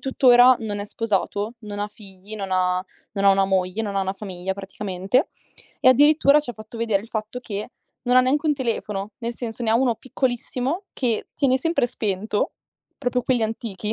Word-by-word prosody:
tuttora 255 -2 +6
non 210 -2 -3
è 205 - -3
sposato, 210 0 -2
non 205 -1 -6
ha 205 - -2
figli, 200 0 -11
non 195 -2 -5
ha 180 0 +2 0.3
non 200 -2 -2
ha 200 - +8
una 195 0 +4
moglie, 190 +2 0
non 200 -2 -3
ha - - +2
una 190 0 -1
famiglia 190 -2 -5
praticamente 195 - -1 0.5
e - - +6
addirittura 290 +2 +6
ci 270 - -6
ha - - -7
fatto 215 +1 -10
vedere 220 -4 +1
il 225 - -13
fatto 220 +2 -4
che 210 -1 -5 0.3
non 250 0 +3
ha - - +9
neanche 280 +5 +1
un 300 - +3
telefono, 215 -6 -3
nel 235 -1 -4
senso, 230 0 -6
ne 220 - +1
ha - - +4
uno 245 -2 +2
piccolissimo 260 - -2
che 235 -4 -1
tiene 265 -3 +2
sempre 330 -4 +1
spento, 210 -2 -1 0.5
proprio 250 0 0
quelli 245 -1 +1
antichi 220 -1 -3
220 Hz, 195 wpm, -23 LUFS, 200-250 Hz, 0.5 s, ha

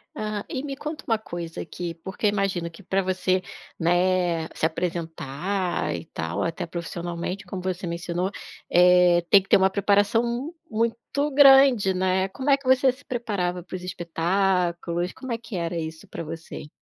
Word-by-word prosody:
Ah, 215 -1 -3
e 260 - -3
me 280 -2 -4
conta 300 +2 -6
uma 225 - +2
coisa 170 -5 -6
aqui, 170 0 -5
porque 190 +6 -6
eu - - +6
imagino 195 -4 -1
que, 165 +3 -14
para 195 +1 0
você, 185 0 0 0.4
né, 175 -1 +2
se - - 0
apresentar 170 +2 -2
e - - -6
tal, 80 +1 -4
até 170 +2 -2
profissionalmente, 175 +3 -5
como 185 0 -6
você 185 0 -3
mencionou, 175 +2 -2 0.4
eh, 180 0 +6
tem 200 - +8
que 190 - -19
ter - - +7
uma 190 0 +4
preparação 205 +3 +2
m 240 +7 -3 0.2
muito 235 +6 -1
grande, 270 -8 +7
né. 185 +1 +1
Como 260 +8 -3
é 275 - +6
que 275 - -20
você 260 0 +5
se 280 +3 -18
preparava 195 -7 -2
para 185 - -8
os 180 - -7
espetáculos? 175 0 0
Como 260 -1 -8
é 230 - 0
que 230 -2 -9
era 170 -1 -2
isso 160 0 -6
para - - -6
você? 160 -1 -8
185 Hz, 175 wpm, -25 LUFS, 170-215 Hz, 0.4 s, tem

